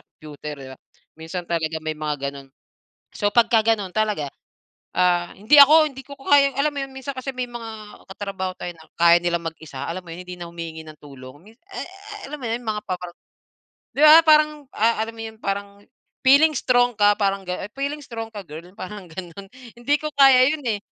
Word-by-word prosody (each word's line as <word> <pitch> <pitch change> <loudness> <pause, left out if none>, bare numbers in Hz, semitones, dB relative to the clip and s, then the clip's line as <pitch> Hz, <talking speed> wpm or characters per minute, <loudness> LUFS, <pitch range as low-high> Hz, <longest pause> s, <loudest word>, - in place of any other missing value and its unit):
computer, 150 0 -10
di 135 -1 -10
ba, - - -24 0.4
minsan 165 +2 -7
talaga 160 -1 -2
may 155 0 -2
mga 150 -1 -3 0.2
ganon. 135 -1 -12 0.7
So 205 -1 0
pagka 230 -1 +4
ganon 210 -5 0
talaga, 210 -9 0 0.7
ah, 175 -1 +2
hindi 215 +9 +2
ako 310 +3 +8
hindi 270 0 -11
ko 280 -1 -10
kaya 275 0 +3
alam 295 +2 +1
mo 280 - -3
yun 270 0 -7
minsan 275 +1 -6
kasi 260 +1 -4
may 250 -1 -3
mga 225 -3 -9
katrabaho 195 -1 -4
tayo 175 - -5
na 160 -1 -18
kaya 170 0 +6
nilang 170 -1 -1
mag-isa 145 -5 -9
alam 180 +2 -5
mo 170 - -12
yun 180 +2 -9
hindi 180 - -7
na 170 -1 -7
humihingi 165 -1 -7
ng 155 -1 -12
tulong, 135 -1 -12
mins 225 +4 -19
e - - -8
eh, - - -9 0.4
alam 300 - -6
mo - - -6
yun 230 - -1
yung 220 - -3
mga 210 - -5
pa-bar 180 -1 -4 0.8
di - - -1
ba 305 +1 +10
parang, 305 -2 +4
ah, 225 +1 +2
alam 225 +1 -5
mo 225 - -8
yun 220 0 -9
parang 200 0 -4 0.4
feeling 300 +4 +6
strong 245 -2 +2
ka, 205 0 +5
parang 195 -1 0
gano 180 - -3
feeling 285 +2 -3
strong 225 -2 -6
ka 205 -2 -7
girl? 155 +1 -8 0.2
Parang 195 -1 -8
ganun, 180 +3 -9 0.3
hindi 245 +5 0
ko 305 - -4
kaya 270 -2 +7
yun 310 - -4
eh. 215 - +1
205 Hz, 205 wpm, -22 LUFS, 170-255 Hz, 0.8 s, ba